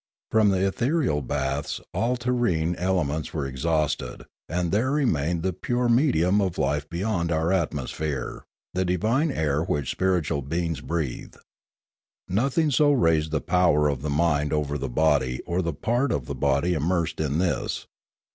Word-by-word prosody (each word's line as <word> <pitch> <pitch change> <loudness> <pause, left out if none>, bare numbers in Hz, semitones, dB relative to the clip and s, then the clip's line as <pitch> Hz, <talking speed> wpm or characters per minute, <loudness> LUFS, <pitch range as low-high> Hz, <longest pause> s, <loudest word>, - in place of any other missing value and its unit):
From 110 -2 +4
the 95 0 +2
ethereal 120 - +1
baths 70 +1 -2
all 115 +7 0
terrene 120 -10 0
elements 85 -5 -1
were 75 -4 -1
exhausted, 70 -1 -1 0.2
and 85 0 -1
there 110 +6 +1
remained 85 - 0
the 95 0 0
pure 120 +6 -1
medium 105 - +3
of 95 -3 -1
life 75 +1 -1
beyond 85 -1 -1
our 80 +1 +1
atmosphere, 75 -5 -2 0.3
the 95 - +1
divine 110 - +1
air 75 - 0
which 75 -4 -1
spiritual 90 -6 0
beings 80 +1 -2
breathe. 75 -1 -4 0.9
Nothing 135 - +1
so 145 +2 +4
raised 80 - +2
the 75 -2 -1
power 85 -5 +3
of 70 -3 -1
the 75 - -3
mind 75 -1 +1
over 75 -1 -1
the 70 -2 -3
body 65 -2 +2
or 90 +1 0
the 85 -2 -1
part 120 - 0
of 70 -4 -1
the - - -4
body 70 +5 +1
immersed 85 +2 -1
in 75 -1 0
this. 90 +1 -1
85 Hz, 155 wpm, -25 LUFS, 75-100 Hz, 0.9 s, From